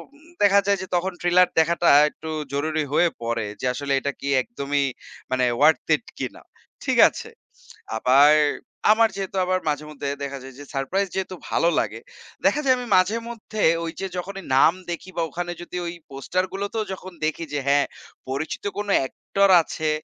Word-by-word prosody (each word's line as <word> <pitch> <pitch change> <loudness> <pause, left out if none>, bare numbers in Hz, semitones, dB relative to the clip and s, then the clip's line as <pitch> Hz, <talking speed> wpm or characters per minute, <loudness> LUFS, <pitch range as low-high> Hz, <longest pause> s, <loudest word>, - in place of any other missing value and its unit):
উম 310 +3 -20
দেখা 200 0 +6
যায় 200 0 +2
যে 185 - -6
তখন 180 +2 0
ট্রেলার 180 +1 +4
দেখাটা 170 +2 +3 0.2
একটু 160 +1 -10 0.2
জরুরি 155 +2 0
হয়ে 175 +3 +4
পড়ে 115 -1 -1 0.2
যে - - -3
আসলে 140 +1 -2
এটা 140 +1 -2
কি 140 - -6
একদমই 140 - -2 0.5
মানে 130 -1 +2
ওয়ার্থ 155 +4 +5
ইট - - -10
কিনা। - - -5 0.4
ঠিক - - 0
আছে। - - -9 0.7
আবার 135 +6 +6 0.6
আমার 225 +1 +4
যেহেতু 195 -1 -4
আবার 185 0 +1
মাঝে 150 0 -1
মধ্যে 145 -1 -5
দেখা 140 0 -4
যায় 135 0 -11
যে 145 - -9
সারপ্রাইজ 180 +9 0
যেহেতু 190 -1 -3 0.2
ভালো 170 - +2
লাগে। 110 +2 -2 0.4
দেখা 195 +10 +3
যায় 260 -2 +4
আমি 250 - -5
মাঝেমধ্যে 220 +2 -1 0.2
ওই 165 - -4
যে 195 - -2
যখনই 195 +2 -6
নাম 155 - +6 0.2
দেখি 175 +2 -6
বা 170 - 0
ওখানে 175 0 -4
যদি 175 - -8
ওই 170 - -4 0.2
পোস্টার 140 +7 -2
গুলোতেও 200 +3 -3
যখন 185 0 -8
দেখি 155 +2 -1
যে 145 - -1
হ্যাঁ 140 0 +4 0.4
পরিচিত 140 +4 -4
কোন 205 0 -3 0.2
একটর 200 +8 0
আছে 155 -1 -3
170 Hz, 175 wpm, -23 LUFS, 140-195 Hz, 0.7 s, দেখা